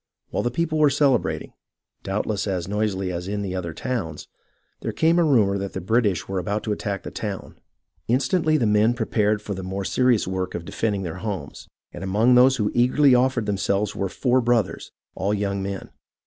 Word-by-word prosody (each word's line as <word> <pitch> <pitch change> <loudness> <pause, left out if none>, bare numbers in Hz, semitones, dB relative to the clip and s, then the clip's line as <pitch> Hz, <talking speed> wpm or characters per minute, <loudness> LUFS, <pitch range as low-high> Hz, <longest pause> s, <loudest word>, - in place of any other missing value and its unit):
While - - 0
the 120 - 0
people 155 +4 -1
were 150 -1 +6
celebrating, 140 -3 +1 0.5
doubtless 105 +1 -2
as 90 -3 -2
noisily 100 -2 -1
as 90 +1 -4
in 100 0 -2
other 90 -3 -3
towns, 95 - -4 0.5
there - - -3
came 165 +2 +3
a - - +4
rumour 105 -10 +3
that 100 0 -5
the - - -3
British 100 -2 +1
were 95 -1 -2
about 100 +4 -2
to 110 - -2
attack 100 -1 -3
the - - -7
town. 100 -3 -6 0.5
Instantly 155 +6 +2
the 125 - +1
men 105 +3 +3
prepared 105 -2 0
for 105 - -4
the 95 - -5
more 95 +1 -4
serious 125 -3 +2
work 95 -1 -3
of 85 -1 -5
defending 100 -1 -2
their 90 +1 -5
homes, 100 -1 -6 0.3
and - - -7
among 105 +6 +3
those 125 +2 +6
who 105 -5 0
eagerly 130 +3 +4
offered 125 -2 +2
them 100 -1 -1
selves 100 +2 0
were 95 - -2
four 125 +5 +1
brothers, 120 -2 0 0.2
all 100 +2 -1
young 100 -1 -2
men. 95 0 -5
105 Hz, 190 wpm, -23 LUFS, 95-125 Hz, 0.5 s, were